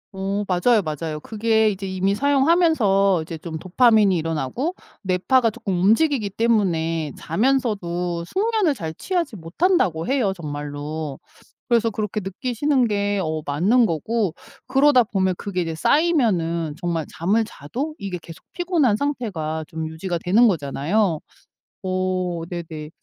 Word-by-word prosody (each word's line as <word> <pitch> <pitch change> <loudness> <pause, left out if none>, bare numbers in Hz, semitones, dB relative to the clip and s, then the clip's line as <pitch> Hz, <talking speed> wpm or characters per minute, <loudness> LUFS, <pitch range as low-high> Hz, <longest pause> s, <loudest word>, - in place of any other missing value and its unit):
어. 195 +2 -2
맞아요. 210 +5 +3
맞아요. 155 -2 -4
그게 220 +1 +2
이제 195 -1 -4
이미 190 +1 0
사용하면서 270 - +3
이제 160 +1 -6
좀 160 0 -6
도파민이 205 +2 +4
일어나고 165 - -2 0.3
뇌파가 205 +6 +2
쪼끔 200 -6 -3
움직이기 225 - +3
때문에 165 -9 0
자면서도 180 -6 -1
숙면을 410 - +1
잘 160 -10 -5
취하지 340 - -2
못한다고 170 - +1
해요 250 -8 +1
정말로. 145 -2 -5 0.5
그래서 230 -1 +3
그렇게 215 -1 -3
느끼시는 245 +7 0
게 205 -1 0
어 155 0 -2
맞는 195 - +3
거고 200 +2 -1 0.3
그러다 270 0 +5
보면 190 -5 0
그게 190 -3 -3
이제 165 -1 -3
쌓이면은 175 - +1
정말 170 -3 -1
잠을 200 +7 +1
자도 255 - -5
이게 195 -7 -4
계속 165 -1 -12
피곤한 335 - +2
상태가 195 - -2
좀 160 0 -5
유지가 170 +3 -3
되는 220 +7 +5
거잖아요. 165 +3 0 0.6
어 185 -2 -1
네네. 160 -3 -6
195 Hz, 310 characters per minute, -22 LUFS, 165-240 Hz, 0.6 s, 그러다